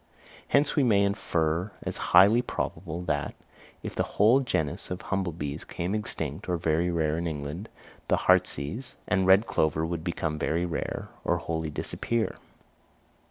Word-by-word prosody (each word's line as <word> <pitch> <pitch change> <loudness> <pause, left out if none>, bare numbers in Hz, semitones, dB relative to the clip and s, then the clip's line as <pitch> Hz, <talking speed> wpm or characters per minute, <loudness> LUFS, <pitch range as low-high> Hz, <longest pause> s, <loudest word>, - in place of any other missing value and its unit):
Hence 140 +1 +3
we 150 - +4
may 105 -5 +4
infer 85 -1 0
as - - -3
highly 100 +7 +7
probable 85 -7 -4
that, 75 -4 -1 0.5
if - - -5
the - - -1 0.2
whole 110 +6 +6
genus 80 - -1
of 90 0 -3
humble 95 -2 -2
bees 75 -1 -5
became 90 +3 -3
extinct 80 -8 -3
or 90 - +1
very 80 +1 +1
rare 80 -2 0
in 85 - -2
England, 80 +7 -5 0.4
the - - +3
heartsease 110 - +1
and 95 0 +2
red 95 +4 +6
clover 80 -6 +1
would 85 -1 -3
become 80 -2 -2
very 85 +2 0
rare, 85 - -4
or 85 - +1
wholly 80 -2 -3
disappear. 115 +9 -2
85 Hz, 155 wpm, -28 LUFS, 80-100 Hz, 0.5 s, highly